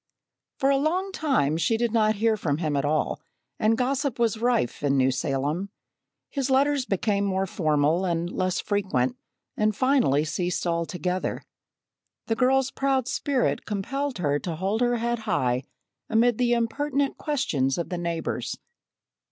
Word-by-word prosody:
For 275 0 +2
a 275 - +3
long 355 +7 0
time 265 - +1
she 225 +7 +1
did 235 -1 0
not 215 -1 +3
hear 220 +2 +2
from 150 -8 -1
him 155 -3 -1
at 140 0 0
all, 155 +1 0 0.4
and 220 +1 +3
gossip 265 +1 0
was 230 -2 +1
rife 240 - +1
in 140 -1 +2
New 130 0 +3
Salem. 140 +8 -1 0.6
His 275 -2 -1
letters 275 0 +2
became 200 +1 0
more 190 -1 0
formal 155 -1 +1
and 170 -2 0
less 185 0 -1
frequent 185 - 0 0.4
and 215 -1 +1
finally 250 - +3
ceased 175 +4 -2
altogether. 175 +1 -2 0.8
The 225 - 0
girl's 265 +2 +2
proud 270 -2 0
spirit 270 -1 0
compelled 270 +7 -2
her 145 -4 0
to 170 0 -4
hold 195 +7 -1
her 245 0 +2
head 235 0 -1
high 130 - 0 0.4
amid 230 +1 +3
the 240 -1 +3
impertinent 275 +4 0
questions 145 - 0
of 170 - -3
the 180 - -3
neighbors. 170 -1 -3
210 Hz, 150 wpm, -26 LUFS, 165-255 Hz, 0.8 s, a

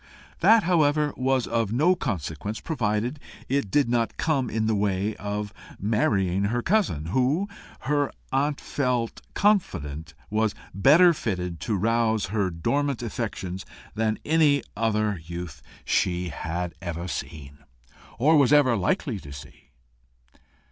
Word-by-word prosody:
That, 225 -1 +6
however, 150 -4 +2
was 130 -1 +1
of 115 -3 -1
no 155 +10 +4
consequence, 100 - -4
provided 120 -1 -1 0.3
it 135 -6 0
did 145 +5 +3
not 120 -1 0
come 140 -6 0
in 110 0 -1
the 110 - +1
way 100 0 0
of 105 +1 -4 0.3
marrying 100 -3 +1
her 120 +4 -1
cousin, 170 - +1
who, 140 +10 +2 0.3
her 145 0 0 0.2
aunt 140 +2 +1
felt 125 -4 -2
confident, 80 - 0 0.2
was 110 0 +1 0.2
better 155 - +6
fitted 90 - -3
to 105 +7 -1
rouse 110 +1 +1
her 100 -4 +1
dormant 135 - -1
affections 100 -6 -4 0.3
than 110 0 0
any 150 -4 +3
other 105 -4 0
youth 85 -3 -7 0.2
she 90 -1 0
had 85 +3 -4
ever 85 +1 -4
seen, 70 -4 -6 0.6
or 150 +7 +4
was 140 -2 +4
ever 145 -5 +5
likely 110 - -1
to 70 - -11
see. 70 +1 -12
110 Hz, 130 wpm, -25 LUFS, 95-140 Hz, 0.6 s, That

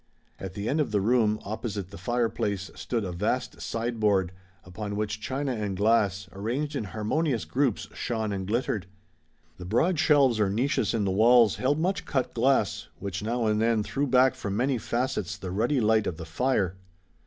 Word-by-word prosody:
At 95 -1 -7
the 100 +2 -4
end 150 +3 +1
of 145 - -1
the 105 -1 +1
room, 110 0 +2
opposite 100 -2 -4
the - - -9
fireplace, 105 -2 -1
stood 115 -3 -3
a 90 - -3
vast 105 +8 -2
sideboard, 110 -6 0 0.3
upon 100 +3 -5
which 105 0 -2
china 135 +4 -2
and 105 -4 -3
glass, 100 -2 +2
arranged 125 +10 -3
in 115 - -2
harmonious 115 - -1
groups, 130 -5 0
shone 110 -3 -2
and 95 -1 -4
glittered. 110 -3 -1 0.7
The 90 - -7
broad 150 - +1
shelves 140 -7 +4
or 105 -2 +3
niches 120 +4 0
in 105 -3 0
the 95 - +1
walls 115 +2 +5
held 140 +3 +1
much 180 +5 -1
cut 130 -4 -1
glass, 135 +1 +1
which 95 -1 -4
now 115 +2 -1
and 105 0 +2
then 115 -2 +2
threw 140 +6 -1
back 130 0 +5
from 100 0 -4
many 130 +1 +1
facets 110 -7 -2
the 95 -2 -6
ruddy 120 +9 +1
light 110 -1 +3
of 80 - -3
the 80 - -7
fire. 95 +1 0
110 Hz, 180 wpm, -27 LUFS, 100-125 Hz, 0.7 s, walls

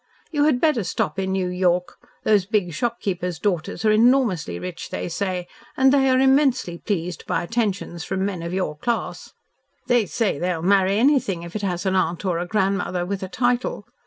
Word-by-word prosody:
You 295 -2 +2
had 290 -5 +3
better 300 -8 +2
stop 190 - -2
in 190 0 -1
New 190 -1 0
York. 180 -1 0 0.3
Those 205 -3 +3
big 200 -6 0
shopkeepers' 190 -7 -2
daughters 180 +3 -2
are 215 - +5
enormously 220 - +3
rich, 180 - -6
they - - -4
say, 180 0 -3 0.3
and 265 +1 +5
they 270 -1 +4
are 255 - +4
immensely 265 - +2
pleased 180 -3 -3
by - - 0
attentions 200 -5 -2
from 190 +1 -2
men 190 -4 -3
of 170 0 -4
your 185 -5 -2
class. 230 +10 -3 0.5
They 240 -4 +2
say 205 -6 -1
they'll 175 -2 -1
marry 195 +1 +3
anything 235 - +2
if 170 +2 -10
it 215 - -2
has 180 -2 -2
an 190 - +1
aunt 175 -1 0
or 175 -3 0
a 175 - -3
grandmother 190 -3 0
with 195 +1 -3
a 190 - -5
title. 245 -2 0
190 Hz, 190 wpm, -23 LUFS, 180-230 Hz, 0.5 s, are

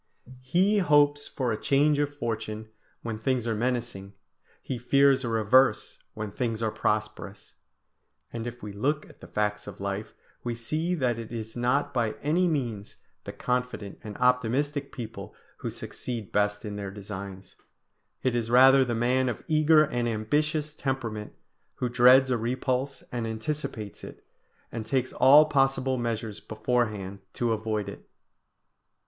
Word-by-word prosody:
"He 185 +11 +2
hopes 145 -3 +3
for 125 -3 -2
a 110 - -3
change 145 +1 +3
of 145 -1 +1
fortune 110 -3 -4 0.3
when 115 -2 -4
things 125 0 0
are 115 - 0
menacing, 115 -4 -2 0.5
he 125 - -5
fears 135 +2 +4
a 120 - -2
reverse 115 +4 +3 0.2
when 105 -1 -4
things 115 -1 -2
are 110 - +1
prosperous." 105 -2 -3 0.8
And 115 0 -4
if 120 -1 -8
we 105 -1 -6
look 145 +9 -1
at - - -18
the - - -10
facts 105 0 -2
of 105 -1 -9
life, 100 +2 -4 0.3
we 120 -1 -2
see 155 +10 -1
that 125 -7 0
it 115 -1 -8
is 110 -1 -6
not 125 +4 +1
by 115 -4 0
any 170 +5 +2
means 120 -10 -2 0.3
the - - -5
confident 125 -5 -3
and 105 -2 -7
optimistic 130 +4 +1
people 115 -3 -8 0.2
who - - -4
succeed 115 -5 -6
best 105 0 0
in 105 -1 -5
their 100 -1 -4
designs. 100 -1 -8 0.7
It 130 -2 +1
is 115 -1 -1
rather 130 +2 +7
the 120 -2 -2
man 125 +2 +2
of 115 - -5
eager 155 0 +5
and 120 -4 -1
ambitious 150 +7 0
temperament, 120 -8 -3 0.4
who 125 - -2
dreads 130 +2 +6
a 120 - +1
repulse 130 +3 -2
and 120 -2 -2
anticipates 110 -2 -4
it, - - -11 0.5
and 115 - -4
takes 130 +3 -1
all 145 +4 +7
possible 135 -2 +1
measures 115 -3 -3
beforehand 110 -4 -2
to 120 -2 0
avoid 110 -1 -2
it. - - -10
120 Hz, 155 wpm, -27 LUFS, 110-135 Hz, 0.8 s, rather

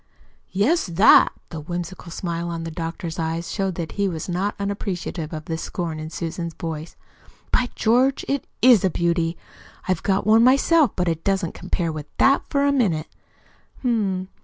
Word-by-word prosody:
"Yes, 260 - +1
'that'!" 180 +5 +6 0.2
The 160 - -6
whimsical 175 +2 -6
smile 170 -1 -3
in 165 0 -4
the 165 - -5
doctor's 165 0 -5
eyes 165 +1 -2
showed 195 -3 -1
that 165 -2 -4
he 200 -1 0
was 165 -4 -4
not 190 +3 -1
unappreciative 195 -5 -3
of 155 -2 -6
the 160 -1 -3
scorn 165 -3 -4
in 155 0 -6
Susan's 170 0 -5
voice. 160 -1 -6 0.6
"By 245 -1 +2
George, 250 +4 +2
it 280 -1 -2 0.2
IS 245 -6 +7
a 190 - +3
beauty! 170 0 0 0.5
I've 185 -3 0
got 195 0 0
one 220 +2 +6
myself, 275 +3 +5
but 180 -1 0
it 165 -1 -1
doesn't 195 -4 0
compare 175 -2 -2
with 155 -1 -6
that, 275 +1 +4
for 280 -1 +2
a 285 - +4
minute. 190 - +1 0.7
H - - -12
m! 195 -6 0
180 Hz, 175 wpm, -23 LUFS, 165-210 Hz, 0.7 s, IS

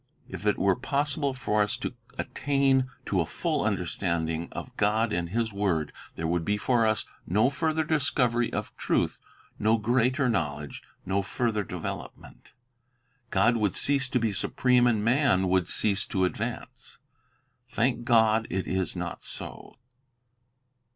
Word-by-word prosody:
If 105 - -5
it 105 - +3
were 95 -1 +3
possible 140 +1 -1
for 105 -4 0
us 105 0 0
to - - -4 0.2
attain 135 -2 +1 0.2
to 95 -3 +1
a - - 0
full - - -1
understanding 80 0 -1
of - - -7
God 110 +2 +1
and 85 -1 -1
His 115 +2 -1
word, 90 -7 0 0.2
there 80 - -4
would 85 +1 0
be 105 +4 0
for 115 +1 +2
us 110 - +1 0.2
no 110 +9 +3
further 160 +2 0
discovery 125 -6 +1
of - - -4
truth, - - 0 0.4
no 110 +2 +3
greater 125 +4 +2
knowledge, 75 - -2 0.2
no 95 +2 +1
further 110 +1 -1
development. - - -7 0.8
God 105 +5 +3
would 105 -4 0
cease 135 -1 +2
to 125 - +1
be 110 -3 0
supreme, 125 +4 +2
and 110 -3 +1
man 120 -7 +3
would 95 -2 +2
cease 100 -1 +1
to 95 -1 +1
advance. 90 - -5 0.7
Thank 120 0 0
God, 110 -2 +4
it 95 +1 -2
is 95 -2 -1
not - - -5
so. - - -8
110 Hz, 145 wpm, -27 LUFS, 95-125 Hz, 0.8 s, God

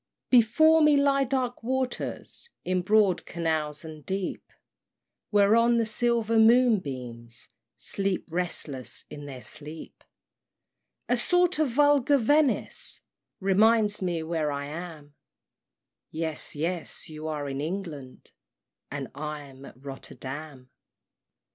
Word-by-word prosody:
II. 250 - +10
Before 315 +9 +5
me 300 -1 +6
lie 280 -1 +3
dark 255 -1 -2
waters 260 - -3 0.2
In 185 0 +1
broad 205 0 +3
canals 160 -2 -2
and 155 -2 -9
deep, 190 +2 -4 0.8
Whereon 225 +3 +4
the 230 - +2
silver 230 0 +1
moonbeams 135 - +2 0.3
Sleep, 195 -2 -2
restless 150 -8 -3
in 145 0 -8
their 130 -3 -8
sleep; 150 +8 -10 1.0
A 245 - +3
sort 355 +6 +2
of 310 -3 +2
vulgar 285 +1 +4
Venice 290 +3 +2 0.4
Reminds 210 +2 +3
me 175 -3 -1
where 160 -2 -1
I 140 0 -3
am; 155 -1 -8 1.0
Yes, 160 -1 -3
yes, 165 +3 -3
you 155 0 -7
are 150 -2 -3
in 135 0 -3
England, 155 -6 -6 0.6
And 140 -2 -5
I'm 145 -2 -7
at 135 +1 -15
Rotterdam. 135 0 -8
180 Hz, 110 wpm, -27 LUFS, 150-235 Hz, 1.0 s, II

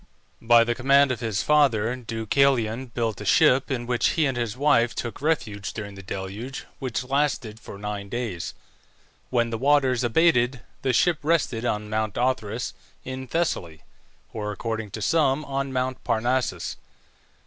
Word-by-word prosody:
By 115 0 +6
the 120 +1 0
command 140 +2 +4
of 125 - -2
his 110 -4 -1
father, 125 -6 +3
Deucalion 120 +1 +1
built 115 -3 -2
a - - -4
ship, 130 +6 +4
in 125 -3 -2
which 120 0 +1
he 160 - +2
and 135 -2 0
his 120 -1 -2
wife 130 -5 +3
took 120 +1 -5
refuge 110 -11 -1
during 105 -2 -6
the 95 - -10
deluge, 100 +7 -6
which 130 -1 -2
lasted 135 -5 -1
for 100 - -10
nine 100 -1 -5
days. 115 -7 -4 0.7
When 120 -2 +1
the 115 - -3
waters 135 -2 +3
abated 125 -1 +3 0.2
the 130 - +1
ship 160 +6 +3
rested 145 -7 +1
on 105 -2 -1
Mount 110 -1 -2
Othrys 120 -2 -1 0.3
in 130 0 -6
Thessaly, 90 - -2 0.5
or 105 -1 -3
according 110 +1 -4
to 110 +2 -5
some 150 +1 +2
on 135 0 -2
Mount 130 0 -2
Parnassus. 125 +3 -1
120 Hz, 155 wpm, -25 LUFS, 110-135 Hz, 0.7 s, By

